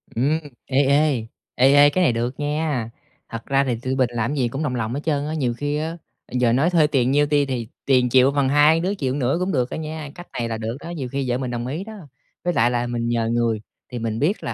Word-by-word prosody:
Ừm, 145 +7 +1 0.3
ê, 135 +1 +2
ê, 140 -3 +2 0.3
ê, 130 +2 +5
ê, 145 0 +7
cái 180 +6 +1
này 140 - +3
được 120 +4 -3
nha, 145 -5 -1 0.4
thật 115 0 -7
ra 135 0 +2
thì 125 -3 -1
tụi 130 +1 -2
mình 130 -2 +2
làm 120 +2 -1
cái 150 - -3
gì 125 -3 +2
cũng 135 +6 -4
đồng 130 -4 -1
lòng 115 -1 -2
hết 140 - -2
trơn 145 -3 0
á, 155 - -3
nhiều 130 -6 0
khi 145 +4 -2
á 160 +2 -3 0.3
giờ 125 -2 +2
nói 140 +7 +3
thuê 165 -4 +4
tiền 130 -4 +1
nhiêu 145 +1 +4
ti 145 -1 +2
thì 125 -4 -3 0.2
tiền 125 -2 +3
chịu 130 +2 +5
bằng 140 -2 +1
hai 150 +3 +5
đứa 185 +4 -1
chịu 135 -8 -2
một - - -2
nửa 130 +2 +1
cũng 185 +1 -1
được 125 -5 0
đó - - -5
nha, 155 -1 -5
cách 175 0 -10
này 115 -1 -3
là 110 - -2
được 115 +2 -4
đó, 165 - -9
nhiều 145 -7 -5
khi 135 -2 -2
vợ 120 - +1
mình 130 -1 -4
đồng 120 0 -3
ý 155 +8 -4
đó. 220 +2 -9 0.5
Với 175 +1 0
lại 120 -2 +3
là 120 0 -1
mình 120 -1 -2
nhờ 115 -1 0
người 115 -2 0 0.3
thì 125 - -4
mình 110 -1 -3
biết 170 +9 0
là, - - -3
135 Hz, 275 wpm, -22 LUFS, 120-150 Hz, 0.5 s, ê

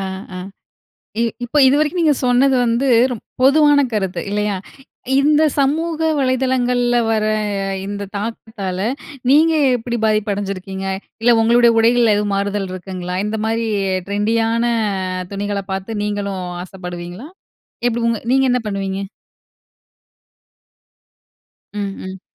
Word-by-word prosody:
ஆ, 190 -1 -6
ஆ. - - -5 0.8
இ - - +3 0.2
இப்ப 295 +5 -2
இதுவரைக்கும் 300 +5 +2
நீங்க 300 -2 +4
சொன்னது 255 +2 +4
வந்து 235 +4 +1 0.2
ரொ - - -2 0.3
பொதுவான 290 +1 +5
கருத்து 190 -4 -1
இல்லையா? 210 -1 0 0.6
இந்த 300 +2 +4 0.2
சமூக 320 +4 0 0.2
வலைதளங்கள்ல 250 -2 +1
வர 215 -1 +1 0.6
இந்த 200 0 -4
தாக்கத்தால 205 -3 -4 0.5
நீங்க 320 +3 +5 0.2
எப்டி 240 0 -3
பாதிப்பு 215 -1 +1
அடஞ்சிருக்கீங்க? 195 -1 -5 0.4
இல்ல 240 +1 +5
உங்களுடைய 235 +1 +5
உடைகள்ல 230 -1 +4
எதுவும் 205 -1 -1
மாறுதல் 200 -1 -2
இருக்குங்களா? 180 -1 -5
இந்த 215 +1 -2
மாதிரி 225 +1 0 0.4
ட்ரெண்டியான 225 +3 +1 0.7
துணிகள 200 0 -2
பாத்து 195 +3 -4
நீங்களும் 200 -2 -3 0.2
ஆசப்படுவீங்களா? 180 - -8 0.6
எப்டி 235 0 -2
உங்க 230 -2 0
நீங்க 270 0 +4
என்ன 250 - +2
பண்ணுவீங்க? 195 -1 -3 2.7
ம், 210 - -4 0.2
ம். 190 0 -8
220 Hz, 115 wpm, -19 LUFS, 195-250 Hz, 2.7 s, பொதுவான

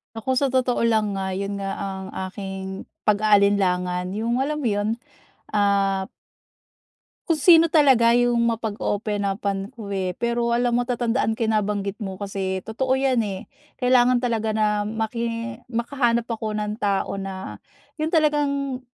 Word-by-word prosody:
Ako 255 +4 -1
sa 280 - +2
totoo 255 -2 +1
lang 215 -3 +1
nga, 190 -1 -2
'yon 200 +1 -3
nga 195 0 -3
ang 190 -1 -5 0.2
aking 190 -1 -6 0.2
pag-aalinlangan, 200 -4 +2
yung 230 +3 0
alam 300 +3 -1
mo 255 - 0
'yon? 205 0 0 0.6
Ah, 200 -2 +2 1.2
kung 330 - +3
sino 330 +2 +6
talaga 265 -7 +5
yung 245 -1 +3
mapag-open 215 -2 -2
up-an 195 0 -2
ko 205 -3 -7
eh. 185 -2 -2
Pero 235 0 0
alam 245 0 +1
mo 245 - +2
tatandaan 240 -2 0
ko 230 - +1
'yang 220 - +1
nabanggit 205 0 -3
mo, 190 -2 -5
kasi 195 -1 -3
totoo 260 +4 0
yan, 265 -3 +2
eh, 195 -3 -5 0.3
kailangan 250 -1 +4
talaga 230 -3 -1
na 215 -1 +3 0.2
maki 230 +2 -3
makahanap 235 -1 0
ako 220 -2 -3
ng 210 0 -2
tao 200 -1 0
na, 190 -1 -6 0.4
yun 310 - +1
talagang 285 -4 +1
220 Hz, 145 wpm, -23 LUFS, 200-245 Hz, 1.2 s, sino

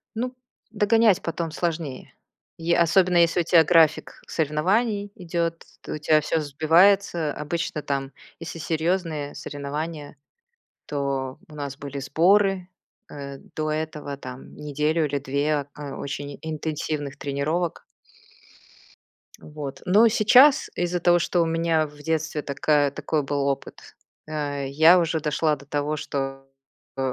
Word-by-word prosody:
Ну, 250 +3 -3 0.4
догонять 220 -2 +3
потом 165 0 -3
сложнее. 160 -6 -4 0.5
Е 170 +1 +1
особенно, 175 +2 +4
если 170 +1 +4
у - - +3
тя 165 -1 +5
график 160 -2 +3
соревнований 200 +7 0
идёт, 170 -3 -3 0.2
то - - -7
у - - -4
тя 155 0 +3
всё 160 +2 0
сбивается. 165 +3 +3
Обычно 155 +1 -3
там, 135 -1 -3 0.3
если 165 0 -7
серьёзные 160 -2 -1
соревнования, 145 +1 -6 0.7
то 135 -2 -3
у 155 - -13
нас 140 -2 -5
были 140 0 -6
сборы, 185 +6 +2 0.4
э, 140 -1 -8 0.2
до 155 0 -1
этого 155 -2 -4
там 130 -1 -10
неделю 150 +2 0
или 145 -1 -1
2, 140 +1 -1
а, 145 -2 -7
очень 140 0 -5
интенсивных 155 -2 -4
тренировок. 155 +5 -2 1.6
Вот, 150 -3 -8
но 210 +6 +6
сейчас, 245 +6 +6
из-за 175 0 -1
того, 175 0 +4
что 175 +1 0
у - - +1
меня 165 -1 +1
в 150 0 -16
детстве 155 0 -2
такая 145 0 +1
такой 150 +2 -2
был 140 0 -1
опыт, 140 -1 -3 0.5
э, 145 -2 -3
я 160 +6 +6
уже 165 -2 0
дошла 150 0 +1
до 140 0 -15
того, 145 +1 -1
что, 135 -2 -4 0.5
о, 135 -1 -1
155 Hz, 135 wpm, -24 LUFS, 145-170 Hz, 1.6 s, но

